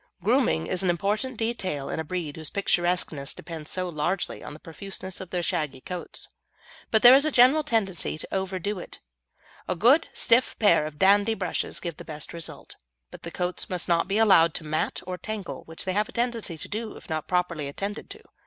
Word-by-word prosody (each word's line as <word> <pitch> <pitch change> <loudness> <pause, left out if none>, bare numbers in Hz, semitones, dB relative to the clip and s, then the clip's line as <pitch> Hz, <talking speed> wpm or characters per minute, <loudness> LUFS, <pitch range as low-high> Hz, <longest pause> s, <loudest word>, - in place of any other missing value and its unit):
Grooming 80 +1 +2
is 180 - -2
an 185 - +1
important 210 +8 0
detail 190 -11 -2
in - - -3
a - - -1
breed 160 -2 -4
whose 160 -2 -6
picturesqueness 175 -7 0
depends 160 -3 -8
so 185 -1 -2
largely 175 +3 -2
on 150 - -8
the - - -12
profuseness 190 +3 -7
of 185 - -8
their 180 -1 -1
shaggy 155 -7 -1
coats, 180 +6 -5 0.6
but 220 - +3
there 245 +1 +11
is 275 +2 +7
a 310 - +2
general 265 +5 +6
tendency 200 - 0
to - - -7
overdo 190 +1 -2
it. - - -8 0.7
A 185 - 0
good 250 - +4
stiff 235 +2 +2
pair 205 -8 +4
of 150 -1 -10
dandy 205 +5 +4
brushes 185 -4 -2
give 170 -4 -5
the - - -9
best 150 -1 -7
results, 170 -2 -7 0.3
but - - -11
the 170 - -6
coats 180 +1 -2
must 180 -2 -2
not 170 0 +2
be 200 +2 0
allowed 190 -7 +5
to - - -3
mat 155 0 -2
or 180 0 -5
tangle, 195 -11 -5
which 160 0 -7
they 185 - 0
have 210 +2 +1
a - - -12
tendency 235 -8 -2
to - - -6
do 220 +1 -5
if - - -14
not 155 -1 -3
properly 175 -5 0
attended 200 - -5
to. 425 +2 -10
185 Hz, 205 wpm, -26 LUFS, 160-210 Hz, 0.7 s, there